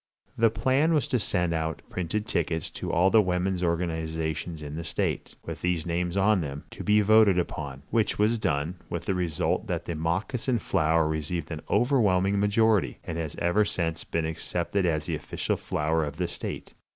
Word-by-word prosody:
The 115 0 +4
plan 130 +9 +2
was 150 - +1
to 125 - +2
send 90 -5 0
out 80 -1 -2
printed 95 +4 -2
tickets, 80 -5 -1
to - - -4
all 90 +3 +3
the 110 - +7
women's 90 -1 0
organizations 80 -2 -2
in 75 0 -6
the 85 - -4
state, 80 - -2
with - - -6
these 90 -3 0
names 85 +2 -1
on 100 0 +4
them, 70 -2 -5
to - - -7
be 105 0 +4
voted 105 -2 +5
upon, 70 -6 -3
which 115 -2 +1
was 110 +2 +2
done, 80 0 -1
with 85 -1 -4
the 95 - +1
result 90 -4 -1
that - - -2
the 85 - -3
moccasin 95 - -1
flower 80 -6 +2
received 80 +1 -3
an 80 -1 -4
overwhelming 100 -5 +3
majority, 105 - +2
and 85 - -4
has 80 -2 -4
ever 85 +5 +2
since 85 -5 -2
been 85 -1 -2
accepted 85 +3 -1
as 75 -2 0
the - - -2
official - - -2
flower 80 +2 0
of 75 0 -5
the 90 - 0
state. - - -6
85 Hz, 185 wpm, -27 LUFS, 80-105 Hz, -, the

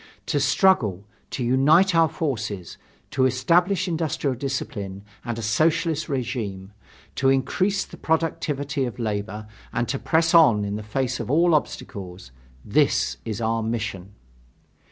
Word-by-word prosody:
To 145 - 0
struggle, 135 - +2 0.2
to 130 - -3
unite 150 +10 +4
our 165 -1 +4
forces, 110 - -4 0.3
to 130 -1 +3
establish 175 +9 +2
industrial 160 -5 -1
discipline 105 -7 -4 0.2
and 120 -1 -4
a 115 - -5
Socialist 155 +7 +1
regime, 110 -7 -4 0.4
to 135 - +2
increase 190 +9 +1
the - - -13
productivity 145 -4 -1
of 120 -1 -6
labor, 105 -1 -3 0.3
and 120 0 -1
to 135 - -1
press 165 +1 +1
on 120 -12 +6
in 100 0 -3
the 105 - -4
face 130 +4 -2
of - - -5
all 165 +4 +4
obstacles 95 - -3 0.3
this 60 0 +2
is 110 0 -4
our 115 0 0
mission. 110 -4 -4
130 Hz, 135 wpm, -24 LUFS, 105-155 Hz, 0.4 s, on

